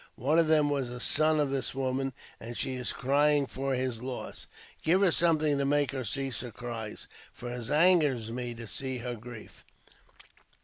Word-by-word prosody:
One 150 Hz, +7 st, +2 dB
of 165 Hz, -, +4 dB
them 150 Hz, -2 st, +4 dB
was 135 Hz, -4 st, -1 dB
a 125 Hz, 0 st, -6 dB
son 155 Hz, +4 st, +3 dB
of 145 Hz, -2 st, +1 dB
this 135 Hz, -1 st, -1 dB
woman, 135 Hz, 0 st, -1 dB, 0.3 s
and 120 Hz, +1 st, -7 dB
she 130 Hz, -, -1 dB
is 125 Hz, -1 st, -1 dB
crying 145 Hz, +2 st, +2 dB
for 135 Hz, 0 st, -2 dB
his 125 Hz, -3 st, -2 dB
loss. 130 Hz, 0 st, -6 dB, 0.3 s
Give 180 Hz, +4 st, +3 dB
her 190 Hz, -3 st, +5 dB
something 155 Hz, -4 st, +3 dB
to -, -, +1 dB
make 145 Hz, +1 st, +2 dB
her 135 Hz, -2 st, -3 dB
cease 135 Hz, +4 st, -1 dB
her 125 Hz, -, -5 dB
cries, 115 Hz, -2 st, -6 dB, 0.3 s
for 120 Hz, 0 st, -7 dB
it 120 Hz, -1 st, -6 dB
angers 150 Hz, -8 st, +3 dB
me 120 Hz, 0 st, -4 dB
to 115 Hz, 0 st, -8 dB
see 130 Hz, +3 st, -3 dB
her 120 Hz, 0 st, -4 dB
grief." 115 Hz, -1 st, -11 dB
135 Hz, 185 wpm, -29 LUFS, 120-145 Hz, 0.3 s, her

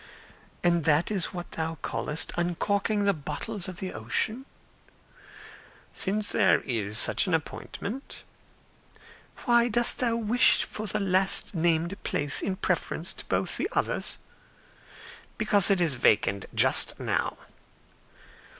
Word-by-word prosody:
"And 170 Hz, -2 st, +2 dB
that 155 Hz, +5 st, +2 dB
is 190 Hz, -5 st, 0 dB
what 175 Hz, -1 st, -8 dB
thou 160 Hz, 0 st, -4 dB
callest 150 Hz, +8 st, 0 dB
uncorking 200 Hz, +4 st, -1 dB
the 200 Hz, 0 st, +2 dB
bottles 170 Hz, +6 st, -5 dB
of 185 Hz, -2 st, -8 dB
the 190 Hz, 0 st, -5 dB
ocean?" 255 Hz, +5 st, -1 dB, 1.5 s
"Since 205 Hz, +2 st, 0 dB
there -, -, +3 dB
is 110 Hz, -4 st, -3 dB
such -, -, +3 dB
an 180 Hz, -, +2 dB
appointment." 200 Hz, -, -6 dB, 1.2 s
"Why 235 Hz, 0 st, +4 dB
dost 240 Hz, +1 st, +1 dB
thou 235 Hz, -2 st, 0 dB
wish 230 Hz, +2 st, +3 dB
for 215 Hz, 0 st, -6 dB
the 210 Hz, -, -1 dB
last 190 Hz, 0 st, +2 dB
named 170 Hz, +2 st, -1 dB
place 145 Hz, -2 st, 0 dB
in 190 Hz, -, -2 dB
preference -, -, -2 dB
to -, -, -12 dB
both -, -, -2 dB
the -, -, -2 dB
others?" -, -, -2 dB, 1.2 s
"Because 205 Hz, -3 st, +7 dB
it 195 Hz, -2 st, +3 dB
is 165 Hz, -5 st, +3 dB
vacant 100 Hz, -5 st, +1 dB
just -, -, +3 dB
now." -, -, -2 dB
185 Hz, 125 wpm, -26 LUFS, 160-210 Hz, 1.5 s, Because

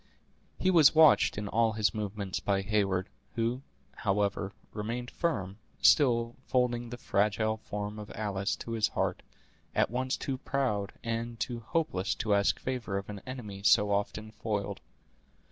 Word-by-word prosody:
He 185 Hz, -, +2 dB
was 160 Hz, -4 st, +6 dB
watched 155 Hz, -8 st, +6 dB
in 105 Hz, 0 st, -3 dB
all 115 Hz, +1 st, +2 dB
his 110 Hz, 0 st, +1 dB
movements 105 Hz, -3 st, -3 dB
by 100 Hz, -1 st, 0 dB
Heyward, 95 Hz, -2 st, +1 dB, 0.3 s
who, 120 Hz, +3 st, 0 dB, 0.4 s
however, 100 Hz, -1 st, 0 dB, 0.2 s
remained 115 Hz, +4 st, -4 dB
firm, 100 Hz, -, -2 dB, 0.2 s
still 120 Hz, -5 st, +4 dB
folding 120 Hz, -2 st, +1 dB
the 120 Hz, -, -6 dB
fragile 110 Hz, 0 st, +1 dB
form 105 Hz, 0 st, -5 dB
of 105 Hz, -, -8 dB
Alice 100 Hz, -1 st, -1 dB
to 115 Hz, -, -8 dB
his 110 Hz, -2 st, +2 dB
heart, -, -, -1 dB, 0.5 s
at -, -, +2 dB
once 130 Hz, +2 st, -1 dB
too 130 Hz, -2 st, -3 dB
proud 105 Hz, -9 st, -1 dB
and 115 Hz, 0 st, -3 dB
too 120 Hz, -2 st, -2 dB
hopeless 115 Hz, -, -1 dB
to 105 Hz, -1 st, 0 dB
ask 100 Hz, 0 st, +3 dB
favor 125 Hz, -6 st, -3 dB
of 100 Hz, +1 st, -5 dB
an 100 Hz, -2 st, -8 dB
enemy 110 Hz, -7 st, -6 dB
so 105 Hz, 0 st, +5 dB
often 105 Hz, +2 st, -1 dB
foiled. 100 Hz, -3 st, -3 dB
110 Hz, 150 wpm, -30 LUFS, 100-120 Hz, 0.5 s, was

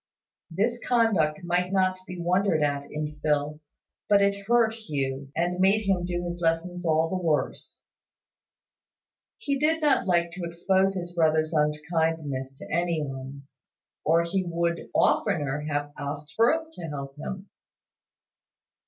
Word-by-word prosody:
This 225 Hz, +8 st, 0 dB
conduct 200 Hz, -10 st, +2 dB
might 175 Hz, +1 st, 0 dB
not 185 Hz, -1 st, +2 dB
be 180 Hz, -, -7 dB
wondered 175 Hz, -2 st, +2 dB
at 145 Hz, -1 st, -1 dB
in 150 Hz, 0 st, -4 dB
Phil; 150 Hz, 0 st, 0 dB, 0.5 s
but 205 Hz, -1 st, +6 dB
it 200 Hz, 0 st, +1 dB
hurt 230 Hz, -1 st, +4 dB
Hugh, 140 Hz, -10 st, -4 dB
and 175 Hz, +2 st, 0 dB
made 195 Hz, +3 st, +4 dB
him 185 Hz, -2 st, +2 dB
do 175 Hz, 0 st, -2 dB
his 175 Hz, 0 st, -5 dB
lessons 170 Hz, +2 st, 0 dB
all 160 Hz, 0 st, +3 dB
the 185 Hz, +1 st, -3 dB
worse. 155 Hz, -3 st, -2 dB, 1.5 s
He 280 Hz, -12 st, -2 dB
did 315 Hz, +2 st, +2 dB
not 295 Hz, -9 st, +2 dB
like 170 Hz, -2 st, +2 dB
to 180 Hz, +1 st, -7 dB
expose 190 Hz, +3 st, +1 dB
his 175 Hz, -1 st, -5 dB
brother's 160 Hz, -1 st, +2 dB
unkindness 150 Hz, -3 st, -1 dB
to -, -, -10 dB
any 170 Hz, -1 st, 0 dB
one, 135 Hz, 0 st, -7 dB, 0.6 s
or 165 Hz, +2 st, +3 dB
he 185 Hz, +3 st, -1 dB
would 170 Hz, -1 st, -2 dB
oftener 145 Hz, -2 st, +2 dB
have 145 Hz, 0 st, -2 dB
asked 145 Hz, +1 st, -6 dB
Firth 315 Hz, +8 st, +3 dB
to 170 Hz, -, -7 dB
help 140 Hz, -2 st, -6 dB
him. 190 Hz, +6 st, -6 dB
170 Hz, 140 wpm, -26 LUFS, 150-190 Hz, 1.5 s, but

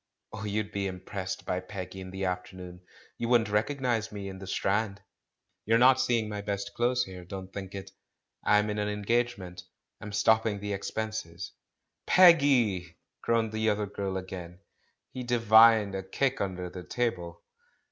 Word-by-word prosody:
Oh, 105 Hz, -, -6 dB
you'd 105 Hz, 0 st, -2 dB
be 100 Hz, 0 st, -2 dB
impressed 95 Hz, 0 st, -5 dB
by 90 Hz, -, -1 dB
Peggy 95 Hz, 0 st, -7 dB
in 95 Hz, -, -8 dB
the 95 Hz, +1 st, -4 dB
afternoon; 90 Hz, 0 st, -5 dB, 0.4 s
you 115 Hz, -, -2 dB
wouldn't 115 Hz, -4 st, +3 dB
recognise 115 Hz, 0 st, 0 dB
me 100 Hz, -1 st, -6 dB
dn 95 Hz, 0 st, -9 dB
tlip 95 Hz, -, -8 dB
Strand. 100 Hz, +1 st, 0 dB, 0.6 s
You're 115 Hz, +2 st, +3 dB
not 130 Hz, +2 st, +6 dB
seeing 115 Hz, -3 st, +1 dB
my 105 Hz, -1 st, -4 dB
best 100 Hz, -1 st, -4 dB
clothes 125 Hz, +1 st, +1 dB
here, 95 Hz, -3 st, -9 dB
don't 95 Hz, +1 st, -8 dB
think 100 Hz, -1 st, -7 dB
it 95 Hz, -, -7 dB, 0.3 s
— -, -, -57 dB
I'm 105 Hz, 0 st, +3 dB
in 105 Hz, -, -3 dB
an 105 Hz, 0 st, -1 dB
engagement, 105 Hz, -4 st, -1 dB, 0.4 s
I'm 105 Hz, -, -7 dB
stop 110 Hz, +2 st, +4 dB
ping 105 Hz, -3 st, -1 dB
the 105 Hz, 0 st, -3 dB
expenses!" 100 Hz, -3 st, -4 dB, 0.6 s
"Peggy!" 130 Hz, -, +5 dB, 0.2 s
groaned 115 Hz, -1 st, +1 dB
the 110 Hz, 0 st, +1 dB
other 105 Hz, 0 st, 0 dB
girl 100 Hz, -1 st, -4 dB
again. 90 Hz, -1 st, -8 dB, 0.5 s
He 130 Hz, -, -6 dB
divined 115 Hz, -3 st, +5 dB
a 95 Hz, -, -2 dB
kick 130 Hz, +8 st, -1 dB
under 90 Hz, -2 st, -3 dB
the 90 Hz, -, -7 dB
table. 90 Hz, -8 st, -3 dB
105 Hz, 165 wpm, -29 LUFS, 95-115 Hz, 0.6 s, not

